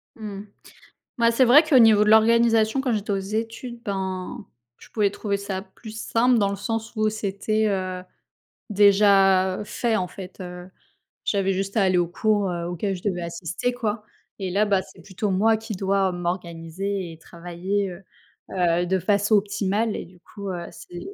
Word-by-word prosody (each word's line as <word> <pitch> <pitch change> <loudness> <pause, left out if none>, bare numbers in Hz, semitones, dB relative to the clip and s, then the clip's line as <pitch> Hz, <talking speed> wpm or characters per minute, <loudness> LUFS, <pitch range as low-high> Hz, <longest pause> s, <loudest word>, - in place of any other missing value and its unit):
Mmh. 205 -3 -7 0.8
Bah, 230 -1 +4
c'est 235 +3 +3
vrai 270 +6 +7
qu'au 305 -5 +4
niveau 220 -3 +6
de 210 - +2
l'organisation 225 +1 +4
quand 260 -3 0
j'étais 210 -1 -2
aux 195 - +1
études, 225 +4 -5
ben, 190 +2 -4 0.3
je - - -17
pouvais 210 -3 +1
trouver 200 -1 -2
ça 195 -1 -4
plus 200 +3 -12
simple 240 +1 +2
dans 200 -2 +2
le 200 - -2
sens 225 +3 -4
où 215 0 +2
c'était, 215 +1 -1
heu, 185 -2 -2 0.7
déjà 195 -2 +4
fait, 230 +2 -1
en 185 -4 -1
fait, 185 +2 -10
heu, 180 0 -8 0.6
j'avais 195 -1 +1
juste 195 +3 -3
à 210 - +4
aller 185 -1 +3
aux 175 - +1
cours, 205 +1 0
heu, 170 -1 -3
auxquels 185 +3 -2
je 180 - -10
devais 185 -4 -1
assister 170 +8 -3
quoi, 225 -3 -3 0.4
et 190 -2 -3
là, 205 +3 +2
bah, 200 -2 +2
c'est 190 - -16
plutôt 195 +4 -3
moi 220 +4 +3
qui 220 0 -7
dois 195 0 +1
m'organiser 175 +1 -4
et 160 - -12
travailler, 175 +4 -3
heu 175 +2 -11 0.5
heu, 175 -1 +1
de 190 0 +1
façon 205 +3 +2
optimale 205 +2 0
et - - -5
du 180 0 -19
coup, 200 +2 -8
heu, 175 -1 -5
c'est 175 0 -10
200 Hz, 180 wpm, -24 LUFS, 185-220 Hz, 0.8 s, vrai